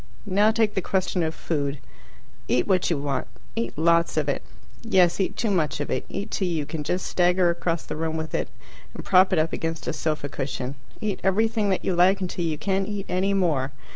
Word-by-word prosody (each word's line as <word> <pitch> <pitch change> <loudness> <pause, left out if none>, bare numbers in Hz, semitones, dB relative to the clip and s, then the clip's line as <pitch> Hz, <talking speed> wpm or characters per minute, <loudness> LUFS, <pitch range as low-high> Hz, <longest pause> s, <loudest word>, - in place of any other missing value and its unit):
Now 205 +2 +4
take 220 -1 +2
the 195 - 0
question 185 -1 0
of 160 -1 -1
food. 145 -3 -2 0.7
Eat 125 - +2
what 185 -3 +2
you 170 - +1
want. 140 -2 -2 0.3
Eat 115 +3 -3
lots 170 +1 +3
of 150 -2 +1
it. 140 - 0 0.4
Yes, 185 -7 +3
eat 190 - -1
too 225 -3 0
much 160 -7 0
of 145 - -3
it. - - -2
Eat 200 +1 -5
till 190 - 0
you 160 -4 -1
can 155 0 -4
just 180 +5 -1
stagger 180 0 +3
across 170 -1 -2
the - - -5
room 160 0 -2
with 160 0 -5
it - - -1 0.5
and - - -7
prop 185 0 +5
it 185 - +2
up 160 +1 +1
against 165 0 -3
a - - -1
sofa 155 -2 -2
cushion. 135 -2 -4 0.3
Eat 210 -3 -2
everything 215 +2 +2
that 190 - 0
you 190 - +1
like 185 +3 +5
until 180 -1 -3
you 160 -2 -1
can't 195 +4 0
eat 205 -1 -4
any 190 +2 +1
more. 150 -8 +1
175 Hz, 215 wpm, -25 LUFS, 155-195 Hz, 0.7 s, prop